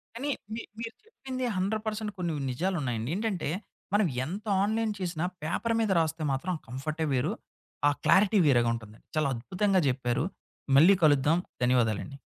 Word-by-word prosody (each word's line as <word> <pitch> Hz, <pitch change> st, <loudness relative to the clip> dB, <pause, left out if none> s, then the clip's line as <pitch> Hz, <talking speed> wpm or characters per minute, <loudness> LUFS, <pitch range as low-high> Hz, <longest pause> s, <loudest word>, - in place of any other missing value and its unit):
కానీ 280 Hz, +5 st, -2 dB, 0.2 s
మీ 230 Hz, -, -4 dB, 0.2 s
మీరు 230 Hz, 0 st, -5 dB
చెప్పింది 260 Hz, -, -5 dB
100% 215 Hz, +2 st, -1 dB
కొన్ని 170 Hz, -3 st, -1 dB, 0.2 s
నిజాలున్నాయండి. 130 Hz, -6 st, -1 dB
ఏంటంటే, 200 Hz, -6 st, -1 dB, 0.5 s
మనము 205 Hz, -7 st, +3 dB, 0.2 s
ఎంత 200 Hz, +8 st, -6 dB, 0.2 s
ఆన్‌లైన్ 220 Hz, +1 st, 0 dB
చేసినా, 175 Hz, -2 st, -2 dB, 0.2 s
పేపర్ 230 Hz, +8 st, -1 dB
మీద 220 Hz, -, +1 dB
రాస్తే 160 Hz, 0 st, -1 dB
మాత్రం 170 Hz, +8 st, -1 dB
ఆ -, -, -30 dB
కంఫర్టే 155 Hz, +5 st, -3 dB
వేరు, 125 Hz, -1 st, +1 dB, 0.6 s
ఆ -, -, +5 dB
క్లారిటీ 205 Hz, +2 st, +5 dB
వేరేగుంటుందండి. 115 Hz, -4 st, +1 dB
చాలా 155 Hz, -2 st, +2 dB
అద్భుతంగా 185 Hz, -, +1 dB
చెప్పారు. 125 Hz, +1 st, 0 dB, 0.5 s
మళ్ళీ 185 Hz, +6 st, +7 dB
కలుద్దాం. 150 Hz, +3 st, +4 dB, 0.2 s
ధన్యవాదాలండి. 125 Hz, +2 st, +1 dB
170 Hz, 135 wpm, -29 LUFS, 135-210 Hz, 0.6 s, మళ్ళీ